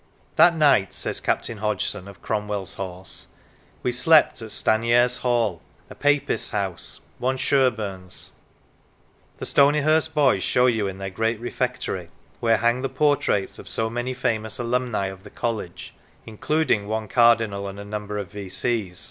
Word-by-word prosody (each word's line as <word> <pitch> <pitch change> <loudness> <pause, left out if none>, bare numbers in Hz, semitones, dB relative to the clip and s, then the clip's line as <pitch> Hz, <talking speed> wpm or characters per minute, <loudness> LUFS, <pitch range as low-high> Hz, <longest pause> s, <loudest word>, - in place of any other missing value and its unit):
" - - -35
That 175 -1 +6
night," 145 -11 +3
says - - -2
Captain 115 -2 -2
Hodgson 105 -2 -2
of 100 0 -13
Cromwell's 105 -4 -2
Horse, 95 -1 -6 0.6
"we 125 - +1
slept 150 +1 +4
at 110 - -7
Stanyares 120 +4 +2
Hall, 115 -8 0 0.3
a - - -6
Papist's 145 0 +1
house, 100 -5 -4 0.2
one 130 +2 0
Sherburn's." 110 -10 -1 1.1
The - - -6
Stonyhurst 155 +3 +3
boys 135 -10 +3
show 125 - +2
you, 110 -5 +2
in 95 -1 -5
their 95 0 -5
great 115 +3 -1
Refectory 120 -7 -3 0.3
(where 115 -1 +3
hang 120 +2 +1
the 135 - -2
portraits 135 -8 +1
of - - -11
so 110 0 -1
many 120 +2 -3
famous 110 -4 -2
alumni 120 -3 -1
of 95 0 -6
the - - -12
college, 110 -7 -4 0.3
including 110 -1 0
one 110 0 -2
Cardinal 115 -3 +3
and 100 +1 -8
a 100 - -7
number 105 0 -5
of 100 -1 -5
V.C.' 100 0 -3
110 Hz, 150 wpm, -24 LUFS, 100-125 Hz, 1.1 s, That